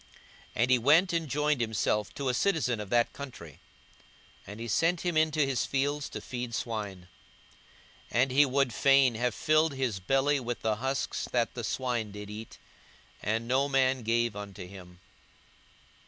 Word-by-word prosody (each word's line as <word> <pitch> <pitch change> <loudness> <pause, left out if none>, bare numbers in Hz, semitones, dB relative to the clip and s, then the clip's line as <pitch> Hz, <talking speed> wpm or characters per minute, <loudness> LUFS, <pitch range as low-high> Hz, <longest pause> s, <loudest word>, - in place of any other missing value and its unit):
42:015:015 - - -26 0.5
And 120 +3 +2
he 125 - +5
went 160 +9 +4
and 165 -3 -1
joined 150 0 +1
himself 105 -2 0
to 140 - -3
a - - +1
citizen 135 - +1
of 105 -2 -6
that 120 +1 +2
country; 100 - -9 0.9
and 105 +2 -8
he 115 - -5
sent 165 - +1
him 175 -2 -1
into 155 -1 +2
his 135 -2 -1
fields 145 +1 -1
to - - -6
feed 120 -2 -5
swine. 100 -4 -4 1.0
42:015:016 120 - +3
And 135 - -2
he 145 +3 +5
would 135 -2 +1
fain 135 0 +4
have 120 +1 -1
filled 155 -1 +2
his 125 -7 -1
belly 135 +8 +2
with 120 -1 -4
the 110 -1 0
husks 135 +3 -2
that 120 -2 0
the 120 - -5
swine 120 -2 -2
did 105 0 -8
eat: 110 +1 -9 0.6
and 110 +3 -1
no 135 +3 +2
man 130 -1 +2
gave 115 -1 0
unto 100 -2 -7
him. 90 -2 -13
125 Hz, 170 wpm, -29 LUFS, 110-140 Hz, 1.0 s, he